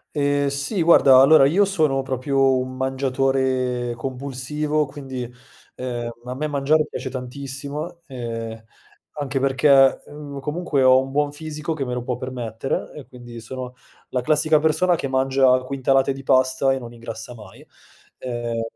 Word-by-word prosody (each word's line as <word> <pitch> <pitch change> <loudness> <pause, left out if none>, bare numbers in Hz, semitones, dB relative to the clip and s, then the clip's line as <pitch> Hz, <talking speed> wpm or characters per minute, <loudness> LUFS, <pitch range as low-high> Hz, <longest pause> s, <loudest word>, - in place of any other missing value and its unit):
Ehm, 145 -1 +1
sì. 140 +7 -2
Guarda, 140 -6 +7
allora, 135 +1 +7
io 180 +8 +3
sono 155 -9 +1
proprio 135 0 +1
un 130 0 -4
mangiatore 130 -2 0
compulsivo, 140 +4 -2
quindi, 135 -2 -7 0.5
ehm, 120 -2 -4 0.2
a 125 - -4
me 150 +4 -3
mangiare 145 +2 +2
piace - - -6
tantissimo, 140 +5 -6
ehm, 115 -3 -6 0.5
anche 140 -2 -3
perché, 135 0 +4
mhmm, 145 -1 -8
comunque 150 -1 -1
ho 130 0 +6
un 135 0 -8
buon 145 0 0
fisico 155 +1 -5
che 145 -4 -3
me 125 - -3
lo 125 - -3
può 125 -1 -2
permettere 125 -1 -4
e 150 - -10
quindi 120 -2 -11
sono 125 +2 -7 0.4
la 125 - 0
classica 155 +3 +3
persona 170 +4 +2
che 140 - -4
mangia 130 -1 +3
quintalate 135 0 +1
di 135 0 -9
pasta 130 0 +2
e 135 - -1
non 120 -2 -9
ingrassa 115 0 -8
mai. 105 -4 -14 0.5
Ehm 120 -2 -4
135 Hz, 150 wpm, -22 LUFS, 125-145 Hz, 0.5 s, Guarda